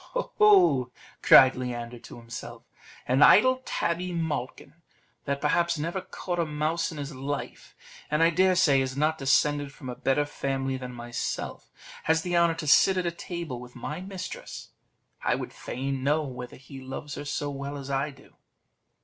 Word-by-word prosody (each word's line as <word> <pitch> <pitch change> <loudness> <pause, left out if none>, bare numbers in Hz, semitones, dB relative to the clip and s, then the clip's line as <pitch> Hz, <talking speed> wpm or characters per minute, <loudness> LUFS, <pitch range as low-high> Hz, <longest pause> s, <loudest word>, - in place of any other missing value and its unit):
"Ho, - - -2
ho!" 370 - +5 0.3
cried 130 -1 +8
Leander 120 -1 -5
to - - -12
himself; 115 0 -9 0.4
"an 130 +3 +2
idle 255 +10 +6
tabby 180 +2 -1
malkin, 150 -5 -4 0.5
that 140 0 -1
perhaps 170 +3 +1
never 170 +5 -3
caught 175 -1 -5
a 170 - +2
mouse 155 +3 -1
in 160 - -8
his 145 0 -5
life, 140 +2 -6 0.3
and 150 +2 +2
I 165 - +5
dare 185 +2 +3
say 140 -6 +4
is 130 0 -3
not 155 +2 +1
descended 145 +1 +2
from 135 -1 -9
a 125 - -5
better 140 +4 +1
family 135 -2 -2
than 125 -1 -6
myself, 120 0 -5 0.3
has 160 0 +2
the 175 -1 -1
honour 170 -1 +4
to 160 - -5
sit 190 +6 +5
at 170 -2 -2
table 170 -8 -5
with 125 0 -12
my 150 +7 -5
mistress: 185 -1 -7 0.5
I - - +1
would - - -6
fain 135 +1 -4
know 150 +3 +2
whether 125 -3 -7
he 135 +1 -11
loves 135 +2 -7
her 145 - -6
so 145 0 -3
well 140 +1 -5
as 140 0 -7
I 140 +2 0
do." 135 - -18
145 Hz, 175 wpm, -27 LUFS, 130-170 Hz, 0.5 s, cried